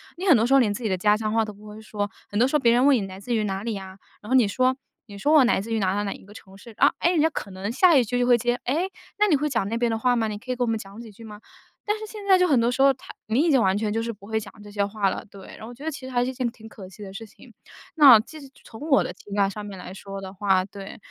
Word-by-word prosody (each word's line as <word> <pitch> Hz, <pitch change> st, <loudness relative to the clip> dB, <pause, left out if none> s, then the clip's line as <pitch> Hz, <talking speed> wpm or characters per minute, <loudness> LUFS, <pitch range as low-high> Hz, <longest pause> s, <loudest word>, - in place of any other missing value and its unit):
你 360 Hz, +3 st, -6 dB
很 325 Hz, -10 st, +6 dB
多 225 Hz, -, +1 dB
时 270 Hz, -, +2 dB
候 275 Hz, -, +6 dB
连 210 Hz, -3 st, +1 dB
自 245 Hz, -, -7 dB
己 220 Hz, -, 0 dB
的 185 Hz, -, 0 dB
家 210 Hz, +3 st, +3 dB
乡 215 Hz, -1 st, -3 dB
话 225 Hz, 0 st, +2 dB
都 215 Hz, -, -6 dB
不 210 Hz, +1 st, -15 dB
会 210 Hz, +1 st, -10 dB
说， 205 Hz, -1 st, -4 dB, 0.2 s
很 205 Hz, -, -2 dB
多 245 Hz, -, +4 dB
时 285 Hz, -, -2 dB
候 -, -, +4 dB
别 235 Hz, -, +4 dB
人 245 Hz, +3 st, +3 dB
问 285 Hz, -1 st, +6 dB
你 235 Hz, -, 0 dB
来 190 Hz, 0 st, -10 dB
自 235 Hz, +4 st, -3 dB
于 215 Hz, -, 0 dB
哪 195 Hz, -1 st, -3 dB
里 230 Hz, 0 st, -3 dB
呀， 190 Hz, -1 st, -8 dB, 0.2 s
然 210 Hz, -, -11 dB
后 260 Hz, -, +2 dB
你 245 Hz, -5 st, +5 dB
说 255 Hz, +5 st, +1 dB, 0.3 s
你 200 Hz, -2 st, -11 dB
说 295 Hz, +10 st, +1 dB
我 300 Hz, -4 st, +7 dB
来 240 Hz, -, +2 dB
自 225 Hz, +2 st, -5 dB
于 220 Hz, -, 0 dB
哪 190 Hz, -, 0 dB
哪 205 Hz, -, -1 dB
哪 200 Hz, -, -3 dB
一 -, -, -14 dB
个 205 Hz, -, -15 dB
城 195 Hz, -3 st, -14 dB
市 230 Hz, +2 st, -14 dB
啊。 -, -, +4 dB
诶， 345 Hz, -, +2 dB
人 330 Hz, -, +2 dB
家 320 Hz, -, +3 dB
可 200 Hz, -, -6 dB
能 190 Hz, +2 st, -5 dB
下 340 Hz, +7 st, +4 dB
一 255 Hz, -, +4 dB
句 245 Hz, +3 st, -2 dB
就 245 Hz, -, +2 dB
会 245 Hz, -1 st, +5 dB
接： 240 Hz, +1 st, 0 dB
“诶， 325 Hz, +9 st, -1 dB, 0.3 s
那 420 Hz, -, +4 dB
你 340 Hz, -, +4 dB
会 295 Hz, +2 st, 0 dB
讲 230 Hz, -7 st, -1 dB
那 230 Hz, -, -2 dB
边 235 Hz, -1 st, 0 dB
的 225 Hz, -, -1 dB
话 250 Hz, +1 st, +2 dB
吗？ 225 Hz, -2 st, 0 dB
你 205 Hz, -, -5 dB
可 255 Hz, +4 st, -16 dB
以 250 Hz, -, -1 dB
跟 245 Hz, -, 0 dB
我 -, -, -2 dB
们 225 Hz, -, 0 dB
讲 200 Hz, +2 st, -11 dB
几 225 Hz, -2 st, -11 dB
句 225 Hz, +3 st, -15 dB
吗？” 210 Hz, -1 st, -11 dB, 0.5 s
但 420 Hz, +1 st, 0 dB
是 435 Hz, -, -6 dB
现 420 Hz, -1 st, -9 dB
在 380 Hz, -2 st, +5 dB
就 365 Hz, -, +4 dB
很 270 Hz, -8 st, +3 dB
多 235 Hz, -, +1 dB
时 260 Hz, +2 st, -1 dB
候 275 Hz, 0 st, +6 dB
它 260 Hz, -, -13 dB
你 225 Hz, +5 st, +1 dB
已 330 Hz, 0 st, +2 dB
经 265 Hz, -4 st, +4 dB
完 190 Hz, 0 st, +2 dB
全 210 Hz, 0 st, -2 dB
就 225 Hz, +2 st, -1 dB
是 230 Hz, 0 st, -4 dB
不 200 Hz, -1 st, -16 dB
会 220 Hz, +1 st, -1 dB
讲 205 Hz, -2 st, -11 dB
这 205 Hz, -, -12 dB
些 205 Hz, -1 st, 0 dB
话 200 Hz, -1 st, -1 dB
了。 -, -, -5 dB
对， 195 Hz, -2 st, -13 dB
然 -, -, -15 dB
后 220 Hz, -, -8 dB
我 245 Hz, -, -9 dB
觉 270 Hz, -, -13 dB
得 320 Hz, -, -2 dB
其 270 Hz, -3 st, -8 dB
实 -, -, -7 dB
还 245 Hz, -1 st, +1 dB
是 255 Hz, -, -2 dB
一 -, -, -12 dB
件 250 Hz, -2 st, -2 dB
挺 220 Hz, -1 st, -14 dB
可 195 Hz, -3 st, -11 dB
惜 205 Hz, +3 st, -12 dB
的 190 Hz, -1 st, -9 dB
事 225 Hz, +3 st, -8 dB
情。 -, -, -18 dB, 0.4 s
那 280 Hz, -8 st, +9 dB
其 310 Hz, +7 st, -12 dB
实 280 Hz, -, -12 dB, 0.2 s
从 220 Hz, -, -13 dB
我 275 Hz, -, +4 dB
的 -, -, -5 dB
情 200 Hz, +2 st, -10 dB
感 200 Hz, -1 st, +2 dB
上 210 Hz, +1 st, -7 dB
面 200 Hz, -2 st, -8 dB
来 180 Hz, 0 st, -9 dB
说 195 Hz, 0 st, -8 dB
的 190 Hz, 0 st, -8 dB
话 190 Hz, -1 st, +1 dB
对， 195 Hz, 0 st, -10 dB
225 Hz, 385 characters per minute, -24 LUFS, 205-255 Hz, 0.5 s, 那